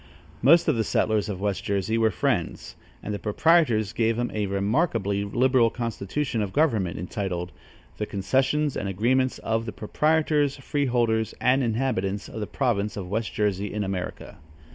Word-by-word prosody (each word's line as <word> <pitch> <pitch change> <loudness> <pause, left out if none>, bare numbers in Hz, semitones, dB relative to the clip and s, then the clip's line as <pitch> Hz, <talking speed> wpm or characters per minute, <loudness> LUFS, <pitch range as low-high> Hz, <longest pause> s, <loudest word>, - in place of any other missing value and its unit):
Most 165 +7 +6
of - - +3
the 115 - +1
settlers 110 0 +1
of 95 -3 -4
West 100 -1 -2
Jersey 100 +2 -1
were 115 -1 +3
Friends, - - -2 0.3
and 105 - -3
the 105 - -3
proprietors 115 - +2
gave 115 0 +1
them 120 0 -1
a 105 -2 -1
remarkably 100 - 0
liberal 120 +3 +3
constitution 115 +2 -3
of 100 -2 -3
government, 115 - +1
entitled: 90 -1 -4 0.5
"The 105 - -3
concessions 135 +8 0
and 100 - -2
agreements 125 +7 +1
of 115 +1 -2
the - - -3
proprietors, 150 +3 +1
freeholders 120 -6 0
and 130 +2 +3
inhabitants 110 -5 -1
of - - -7
the 105 - -3
province 105 -7 -1
of 95 -3 -5
West 110 +1 -2
Jersey 105 -1 -1
in 105 -1 -2
America." 95 -2 -5
110 Hz, 160 wpm, -25 LUFS, 100-130 Hz, 0.5 s, Most